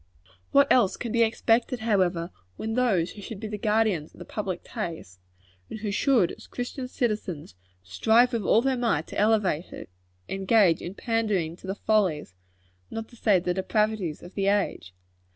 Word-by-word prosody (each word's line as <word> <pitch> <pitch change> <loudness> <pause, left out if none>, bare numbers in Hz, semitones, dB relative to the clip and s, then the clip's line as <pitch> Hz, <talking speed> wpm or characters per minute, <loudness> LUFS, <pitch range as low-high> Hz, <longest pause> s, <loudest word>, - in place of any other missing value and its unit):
What 280 0 +6
else 215 -7 +4
can 235 - -4
be 235 - +2
expected, 230 +2 +2
however, 185 -6 +1 0.3
when 220 0 -3
those 215 -9 +1
who 205 - -11
should 200 +1 -7
be 220 - -5
the 210 - -4
guardians 210 -8 +1
of - - -20
the - - -9
public 190 -4 -4
taste 160 - -6 0.5
and 215 - -7
who 210 -2 -2
should, 230 -3 +3
as - - -12
Christian 250 +1 -5
citizens, 210 - -3 0.3
strive 225 - +3
with 230 - 0
all 220 +4 +3
their 265 -1 +1
might 225 -11 0
to - - -4
elevate 205 -6 +1
it - - -9 0.4
engage 195 -3 +3
in 180 +3 -6
pandering 210 -9 -1
to 190 - -12
the 190 - -2
follies, 190 - 0 0.6
not 225 0 -6
to 240 - -16
say 210 -4 +3
the 180 0 -1
depravities, 195 -2 -1
of 175 - -11
the 195 -1 -1
age? 195 - 0
210 Hz, 175 wpm, -26 LUFS, 180-225 Hz, 0.6 s, What